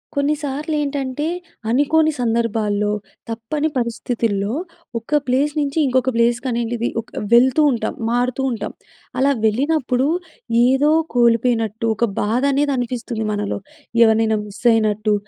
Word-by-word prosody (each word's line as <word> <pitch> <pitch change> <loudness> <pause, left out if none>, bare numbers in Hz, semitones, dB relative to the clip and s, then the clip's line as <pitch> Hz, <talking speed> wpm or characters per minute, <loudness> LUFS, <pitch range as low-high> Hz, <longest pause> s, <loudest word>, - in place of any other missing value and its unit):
కొన్నిసార్లు 295 +1 -1
ఏంటంటే 280 0 -2 0.4
అనుకోని 310 +5 +3
సందర్భాల్లో 225 -3 0 0.4
తప్పని 260 +8 -2
పరిస్థితుల్లో 230 -3 -1 0.5
ఒక 295 +7 0
ప్లేస్ 275 +4 +1
నుంచి 285 0 -2
ఇంకొక 260 0 +2
ప్లేస్ 235 0 +3
కనేడిది 235 -1 -1
ఒక 225 - -24 0.2
వెళ్తూ 255 +5 +5
ఉంటాం. 235 - -2 0.2
మారుతూ 245 +2 0
ఉంటాం. 215 -3 -4 0.5
అలా 275 +2 +4
వెళ్ళినప్పుడు 260 +2 +1 0.6
ఏదో 270 +4 +3 0.2
కోల్పోయినట్టు 230 -2 +2
ఒక 235 - +2 0.2
బాధ 225 +4 +1
అనేది 285 +1 +1
అనిపిస్తుంది 235 -2 -3
మనలో. 205 -1 -2 0.5
ఎవరినైనా 220 -1 +3
మిస్ 205 - -12
అయినట్టు 215 -1 +1
240 Hz, 115 wpm, -20 LUFS, 225-275 Hz, 0.6 s, వెళ్తూ